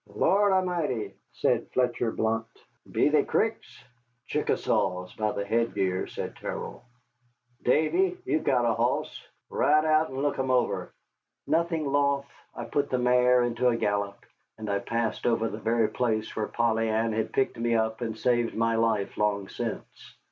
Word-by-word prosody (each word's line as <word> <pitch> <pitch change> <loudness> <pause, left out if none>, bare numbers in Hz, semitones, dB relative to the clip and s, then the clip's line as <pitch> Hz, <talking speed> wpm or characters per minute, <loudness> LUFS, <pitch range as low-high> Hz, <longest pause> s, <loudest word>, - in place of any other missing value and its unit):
"Lord 200 +1 +2
A'mighty!" 175 - 0 0.2
said - - 0
Fletcher 120 -2 +1
Blount, 110 0 -1 0.4
"be - - +3
they - - +3
Cricks?" - - -2 0.4
"Chickasaws, 90 0 -1
by 110 -1 -1
the 100 - -3
headgear," 100 -4 0
said - - -6
Terrell. - - -6 0.8
"Davy, 360 - +2
you've 320 -5 0
got 125 -3 +2
a 115 - +3
hoss. - - -1 0.3
Ride 155 +1 +3
out 155 0 +3
and 130 +1 -4
look 145 -2 0
'em 130 0 -1
over." 125 -1 0 0.5
Nothing 165 -1 0
loath, 140 0 +1 0.3
I 120 - -5
put 140 +4 -1
the 130 - +1
mare 125 0 +4
into 120 +1 0
a 120 -1 +3
gallop, 100 -2 -2 0.3
and 110 -1 -4
I 100 - +1
passed 115 +2 -2
over 115 -1 +2
the 110 - -6
very 115 +1 +1
place 110 -3 -1
where 110 -1 -1
Polly 115 -1 +1
Ann 110 +1 +1
had 110 0 -1
picked 135 - 0
me 115 0 +1
up 110 +1 0
and 110 -2 -3
saved 120 -1 +1
my 115 +1 +1
life 115 -3 0
long 100 -2 0
since. - - -6
115 Hz, 160 wpm, -27 LUFS, 110-135 Hz, 0.8 s, mare